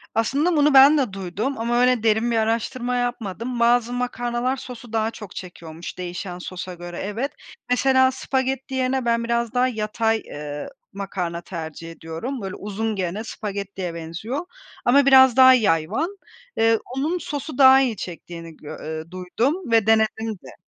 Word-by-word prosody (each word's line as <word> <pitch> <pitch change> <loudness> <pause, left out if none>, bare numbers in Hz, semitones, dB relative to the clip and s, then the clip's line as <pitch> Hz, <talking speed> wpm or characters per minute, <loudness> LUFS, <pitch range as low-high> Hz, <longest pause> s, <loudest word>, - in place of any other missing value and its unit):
Aslında 285 +10 +1
bunu 295 -1 +4
ben 275 +3 +8
de 255 -9 0
duydum 195 +8 -3
ama 240 +2 +1
öyle 250 -3 +3
derin 225 +2 +2
bir 230 - +1
araştırma 235 +3 -1
yapmadım. 240 0 -3
Bazı 240 0 +3
makarnalar 245 +1 -1
sosu 245 -3 -10
daha 220 0 +1
çok 210 -5 -10
çekiyormuş 170 -2 -8
değişen 180 0 -5
sosa 180 0 -6
göre, 175 0 -8
evet. 225 +8 -3 0.4
Mesela 260 +1 +4
spagetti 265 0 -2
yerine 260 0 0
ben 235 0 +1
biraz 235 0 -1
daha 250 +1 +3
yatay, 225 -1 0
eee, 145 - -6 0.2
makarna 185 -4 -4
tercih 165 -1 -7
ediyorum. 165 +11 -6
Böyle 195 0 -5
uzun 210 +2 -3
gene, 190 +3 -3
spagettiye 200 -5 -5
benziyor 170 - -5 0.4
ama 275 +3 +5
biraz 265 -2 +7
daha 260 0 +9
yayvan. 220 - +1 0.4
Eee, 225 0 +4 0.2
onun 310 +6 0
sosu 295 -4 -5
daha 265 0 +8
iyi 240 -5 0
çektiğini 165 -2 -8
gö 155 +1 -9
eee, 160 +1 -6
duydum 235 - -2
ve 225 -2 +4
denedim 220 0 +2
de. 130 - -12
225 Hz, 155 wpm, -23 LUFS, 185-255 Hz, 0.4 s, daha